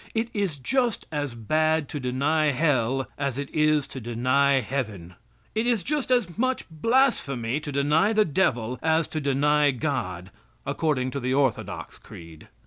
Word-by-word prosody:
It 225 +1 0
is 195 -8 -1
just 240 - 0
as 145 -5 -3
bad 155 +6 +1
to 145 - -4
deny 140 +5 +1
Hell 135 -3 +1
as 140 -3 -2
it 140 -1 -5
is 155 -2 +3
to 130 - -7
deny 130 +5 +2
Heaven. 105 -9 -4 0.4
It 220 +2 0
is 230 -6 +1
just 295 - -2
as 225 -7 +1
much 255 +1 0
blasphemy 155 - +1
to 150 -1 -6
deny 150 +8 +2
the 215 -1 +3
devil 125 -7 0
as 160 0 +2
to 155 - -3
deny 145 +1 +3
God, 115 - -3 0.3
according 130 -5 0
to 140 - -3
the 130 0 -1
orthodox 135 -5 -1
creed. 80 -2 -13
145 Hz, 155 wpm, -25 LUFS, 130-160 Hz, 0.4 s, is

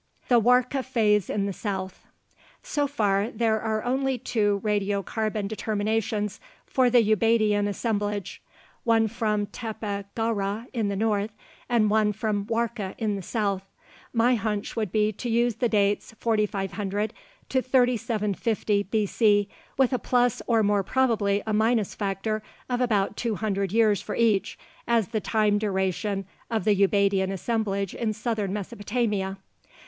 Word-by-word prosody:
THE 240 -2 +6
WARKA 250 +3 +3
PHASE 215 -6 +2
IN 200 -1 0
THE 200 - -2
SOUTH 190 -2 -5 0.6
So 295 -13 0
far, 210 -6 +1
there 225 -3 0
are 220 -1 -1
only 265 +1 0
two 205 -4 0
radiocarbon 205 0 -1
determinations 215 0 -1 0.3
for 255 -3 +2
the 240 -1 +5
Ubaidian 215 -1 +3
assemblage, 205 -1 -2 0.4
one 225 -1 +3
from 215 -2 -1
Tepe 210 -2 -5
Gawra 220 -1 -1
in 225 -4 0
the 200 - -1
north 210 0 0 0.4
and 235 -3 +3
one 215 -1 +3
from 210 -1 -1
Warka 230 -4 -2
in 215 -3 -1
the 195 - -4
south. 200 -1 -1 0.5
My 240 +1 +3
hunch 215 -3 -2
would 215 -5 -2
be 215 0 +2
to 240 +4 -5
use 235 -1 +2
the 240 - +1
dates 205 +1 +1
4500 205 -1 -1 0.4
to 260 - +2
3750 225 -4 +1
B.C., 205 0 +2 0.3
with 265 -1 +3
a 250 - +1
plus 245 +2 +1
or 230 -2 +3
more 205 -1 +3
probably 205 -3 +1
a 215 - -1
minus 220 -1 +2
factor 205 +2 -2 0.3
of 245 0 -1
about 210 -5 +1
two 230 -3 -1
hundred 200 -2 -1
years 215 -2 +3
for - - -5
each, 220 -4 +1 0.3
as 230 -5 +2
the 220 - -1
time 210 -1 +2
duration 195 0 -1 0.2
of 225 -2 -1
the 210 -2 +4
Ubaidian 195 -1 +2
assemblage 200 -1 -1
in 220 -2 -1
southern 215 -3 -2
Mesopotamia. 205 -1 -2
215 Hz, 145 wpm, -26 LUFS, 200-230 Hz, 0.6 s, THE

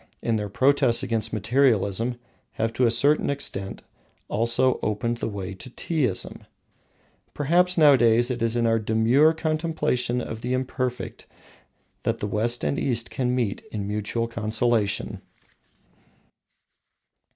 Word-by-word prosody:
in 115 - +1
their 105 -1 -3
protests 130 +1 +3
against 110 -1 -1
materialism, 115 0 +1 0.4
have, 115 0 -2
to 125 +1 +2
a - - +3
certain 140 +6 +3
extent, 100 -9 -3 0.5
also 120 +4 +1
opened 115 +3 -1
the 115 - -3
way 100 -2 -5
to 95 +7 -10
Teaism. 130 - -2 0.9
Perhaps 175 +5 +2
nowadays 120 -5 +5
it 120 - -4
is 115 0 0
our 115 -1 +2
demure 115 +8 +3
contemplation 155 -6 -1
of 115 -2 -6
the 125 +1 -2
Imperfect 130 -1 -3 0.7
that - - -1
the - - -3
West 115 +4 -1
and 140 - 0
the - - -3
East 120 -3 -1
can 125 -1 -1
meet 115 -6 -1
in 100 -2 -4
mutual 105 +3 -2
consolation. 110 -1 -1
120 Hz, 130 wpm, -24 LUFS, 110-130 Hz, 0.9 s, nowadays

